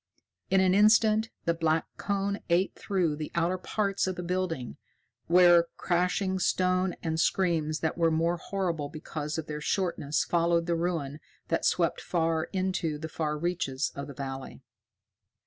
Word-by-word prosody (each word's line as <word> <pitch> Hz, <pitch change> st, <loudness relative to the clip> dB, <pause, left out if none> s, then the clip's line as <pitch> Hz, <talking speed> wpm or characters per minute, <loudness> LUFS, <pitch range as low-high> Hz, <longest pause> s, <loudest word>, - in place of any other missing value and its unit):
In 190 Hz, 0 st, +4 dB
an 185 Hz, -1 st, +3 dB
instant 215 Hz, +2 st, +4 dB, 0.2 s
the 170 Hz, -, +2 dB
black 160 Hz, -1 st, +1 dB
cone 200 Hz, 0 st, -1 dB
ate 175 Hz, +3 st, +2 dB
through 180 Hz, -6 st, 0 dB
the 150 Hz, 0 st, -6 dB
outer 170 Hz, +2 st, +1 dB
parts 200 Hz, 0 st, -1 dB
of 185 Hz, -, -2 dB
the 180 Hz, -, -5 dB
building, 170 Hz, -, -3 dB, 0.5 s
where 175 Hz, -1 st, +6 dB
crashing 185 Hz, +2 st, 0 dB
stone 185 Hz, 0 st, +1 dB
and 160 Hz, -1 st, -1 dB
screams 165 Hz, -4 st, +1 dB
that 160 Hz, +1 st, -1 dB
were 165 Hz, -1 st, +4 dB
more 165 Hz, +2 st, +1 dB
horrible 170 Hz, -5 st, -3 dB
because 155 Hz, 0 st, -5 dB
of 160 Hz, -, -3 dB
their 150 Hz, -1 st, -5 dB
shortness 170 Hz, -5 st, 0 dB
followed 170 Hz, 0 st, +1 dB
the 170 Hz, 0 st, 0 dB
ruin 165 Hz, -4 st, -2 dB, 0.3 s
that -, -, 0 dB
swept -, -, +1 dB
far 165 Hz, -1 st, 0 dB
into 185 Hz, -5 st, -2 dB
the 160 Hz, +1 st, -6 dB
fair 150 Hz, -1 st, -2 dB
reaches 150 Hz, -5 st, -1 dB
of 140 Hz, 0 st, -6 dB
the 140 Hz, -, -9 dB
valley. 135 Hz, -1 st, -7 dB
170 Hz, 155 wpm, -28 LUFS, 155-185 Hz, 0.5 s, where